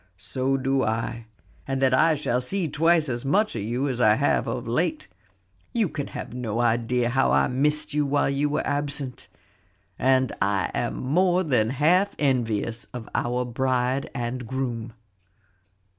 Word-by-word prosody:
"So 130 Hz, +8 st, -1 dB
do 135 Hz, 0 st, +1 dB
I, 115 Hz, +1 st, -2 dB, 0.4 s
and 135 Hz, 0 st, -1 dB
that 130 Hz, -1 st, +3 dB
I 160 Hz, +5 st, +4 dB
shall 125 Hz, -4 st, -1 dB
see 180 Hz, +7 st, -1 dB
twice 160 Hz, +2 st, +2 dB
as 120 Hz, -2 st, -3 dB
much 200 Hz, -, +1 dB
of 115 Hz, -, -2 dB
you 120 Hz, +7 st, -1 dB
as 125 Hz, -3 st, -2 dB
I 110 Hz, -2 st, +5 dB
have 140 Hz, +4 st, +1 dB
of 125 Hz, -2 st, -3 dB
late. 180 Hz, -, -1 dB, 0.7 s
You 225 Hz, -7 st, +1 dB
can 145 Hz, -2 st, -4 dB
have -, -, -7 dB
no 120 Hz, -3 st, -3 dB
idea 120 Hz, +1 st, +1 dB
how 135 Hz, +2 st, +2 dB
I -, -, +3 dB
missed 150 Hz, +4 st, +1 dB
you 150 Hz, 0 st, +2 dB
while 145 Hz, +1 st, +2 dB
you 140 Hz, +2 st, 0 dB
were 145 Hz, -, -1 dB
absent. 145 Hz, -2 st, -2 dB, 0.7 s
And 130 Hz, 0 st, +3 dB
I 100 Hz, -3 st, +1 dB
am -, -, -2 dB
more 180 Hz, +7 st, +2 dB
than 125 Hz, -9 st, +1 dB
half 165 Hz, +9 st, +2 dB
envious 120 Hz, -3 st, 0 dB
of 120 Hz, -3 st, -9 dB
our 125 Hz, +1 st, 0 dB
bride 130 Hz, +2 st, 0 dB
and 120 Hz, -1 st, -3 dB
groom. 120 Hz, -3 st, -3 dB
130 Hz, 160 wpm, -25 LUFS, 120-145 Hz, 0.7 s, I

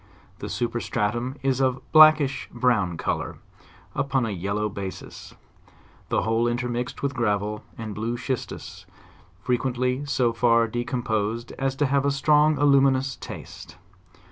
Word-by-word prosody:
The -, -, -5 dB
superstratum 120 Hz, +1 st, -2 dB
is 135 Hz, -1 st, +1 dB
of 130 Hz, -1 st, +2 dB
a -, -, -16 dB
blackish 155 Hz, -4 st, +6 dB
brown 115 Hz, -8 st, +1 dB
color, -, -, -3 dB, 0.6 s
upon 135 Hz, -3 st, 0 dB
a 110 Hz, -, -3 dB
yellow 100 Hz, +3 st, -2 dB
ba 100 Hz, -2 st, -5 dB
sis, 95 Hz, -, -12 dB, 0.7 s
the -, -, +1 dB
whole 115 Hz, +1 st, +1 dB
intermixed 120 Hz, +1 st, -3 dB
with 140 Hz, 0 st, 0 dB
gravel 105 Hz, -4 st, -1 dB
and 110 Hz, -2 st, -5 dB
blue 115 Hz, +3 st, -3 dB
schistus, 130 Hz, 0 st, -5 dB, 0.6 s
fre 125 Hz, -, 0 dB
quently 130 Hz, +2 st, -1 dB
so 125 Hz, -4 st, +2 dB
far 115 Hz, 0 st, +3 dB
decomposed 120 Hz, -2 st, -2 dB
as 135 Hz, -1 st, 0 dB
to 145 Hz, -, +1 dB
have 140 Hz, 0 st, +1 dB
a 140 Hz, -, +2 dB
strong 150 Hz, +2 st, +3 dB
aluminous 135 Hz, -2 st, +3 dB
taste. 85 Hz, -, -10 dB
120 Hz, 140 wpm, -25 LUFS, 110-135 Hz, 0.7 s, blackish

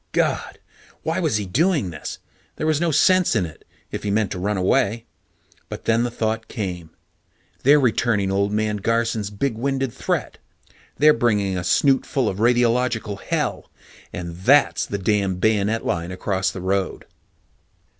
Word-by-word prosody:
God! -, -, 0 dB, 0.5 s
Why -, -, -1 dB
was 110 Hz, -, +1 dB
he 105 Hz, -, -3 dB
doing 145 Hz, -, +1 dB
this? 80 Hz, -, -7 dB, 0.4 s
There -, -, -3 dB
was 155 Hz, 0 st, +1 dB
no 170 Hz, -, +2 dB
sense 185 Hz, +4 st, +3 dB
in 90 Hz, -, +2 dB
it, 80 Hz, -2 st, -11 dB, 0.3 s
if -, -, -4 dB
he 105 Hz, -, -3 dB
meant 105 Hz, 0 st, +1 dB
to 90 Hz, -, -4 dB
run 100 Hz, +2 st, -1 dB
away. 100 Hz, +4 st, +1 dB, 0.6 s
But -, -, -7 dB
then 115 Hz, +1 st, +3 dB
the 120 Hz, -, 0 dB
thought 110 Hz, -1 st, -2 dB
came: 90 Hz, -6 st, -5 dB, 0.7 s
they're 145 Hz, +3 st, +6 dB
returning 115 Hz, -6 st, +1 dB
Old 100 Hz, +1 st, +1 dB
Man 105 Hz, 0 st, 0 dB
Garson's 115 Hz, 0 st, 0 dB
big 115 Hz, +6 st, -2 dB
winded 135 Hz, +1 st, -1 dB
threat. -, -, -3 dB, 0.6 s
They're 150 Hz, +1 st, +6 dB
bringing 105 Hz, -6 st, +1 dB
a 90 Hz, -, -2 dB
snootful 135 Hz, +6 st, +2 dB
of 95 Hz, -, -2 dB
radiological 120 Hz, -3 st, +1 dB
hell, -, -, -2 dB, 0.4 s
and 85 Hz, -2 st, -6 dB
that's 135 Hz, +10 st, +3 dB
the 100 Hz, -, -3 dB
damned 95 Hz, -2 st, 0 dB
bayonet 110 Hz, +1 st, +1 dB
line 85 Hz, +1 st, -2 dB
across 95 Hz, +1 st, -1 dB
the 95 Hz, -, -7 dB
road. 95 Hz, 0 st, -1 dB
110 Hz, 155 wpm, -22 LUFS, 95-120 Hz, 0.7 s, they're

